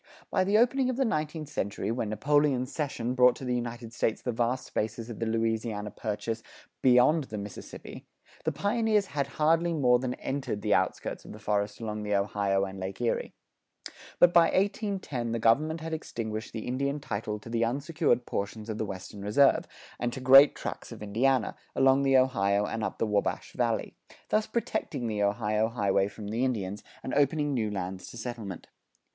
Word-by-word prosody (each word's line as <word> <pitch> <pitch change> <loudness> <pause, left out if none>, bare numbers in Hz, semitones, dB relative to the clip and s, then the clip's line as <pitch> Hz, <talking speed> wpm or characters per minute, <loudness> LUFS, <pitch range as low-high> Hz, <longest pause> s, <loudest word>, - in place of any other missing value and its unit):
By 185 - +3
the 200 +3 +3
opening 255 +3 +3
of 255 - -2
the 270 - +2
nineteenth 155 - -2
century, 100 -4 -2
when 115 -2 -2
Napoleon's 135 +3 +2
cession 130 -5 -2
brought 125 -1 +5
to 130 - -8
the 125 - 0
United 120 -1 -4
States 115 -2 0
the 125 - -2
vast 120 +3 -1
spaces 115 +2 -3
of 110 - -8
the 115 - -1
Louisiana 110 -2 -1
Purchase 110 +1 -3 0.4
beyond 130 +5 +5
the 110 - -6
Mississippi, 100 0 -9 0.4
the 160 - +1
pioneers 210 +5 +1
had 145 -6 -2
hardly 165 +2 +3
more 125 -5 +4
than 125 0 -2
entered 130 -7 -3
the 105 -2 +2
outskirts 95 +1 -1
of - - -10
the - - -10
forest 105 0 -1
along 105 -2 -4
the 105 -1 0
Ohio 100 -1 +1
and 95 0 -7
Lake 95 +1 -5
Erie. 120 -1 -1 0.8
But 175 0 +6
by 170 -1 +7
1810 190 - -1
the - - 0
government 150 +9 +2
had 160 0 -4
extinguished 110 -7 -4
the 110 -1 -5
Indian 140 +3 -1
title 105 -5 -3
to 110 - -11
the 115 0 +1
unsecured 140 0 +1
portions 105 +2 -4
of 110 - -5
the 110 - 0
Western 95 +1 -7
Reserve, 105 +8 +3 0.3
and 120 0 -1
to - - -5
great 135 +3 +8
tracts - - -6
of - - -8
Indiana, 125 +5 +1 0.2
along 135 +1 +4
the 135 -1 +4
Ohio 100 -6 +2
and 110 +1 -3
up - - -3
the - - +1
Wabash 105 -2 -1
Valley; - - -1 0.4
thus 215 0 +2
protecting 215 - -2
the 105 -2 -1
Ohio 105 +1 +1
highway 100 -4 +1
from 105 0 -8
the 115 +4 -1
Indians, 105 -6 -2 0.2
and 130 - -4
opening 145 +1 +2
new 110 -5 0
lands 95 -2 -5
to - - -10
settlement. 115 -6 -6
120 Hz, 185 wpm, -29 LUFS, 105-140 Hz, 0.8 s, great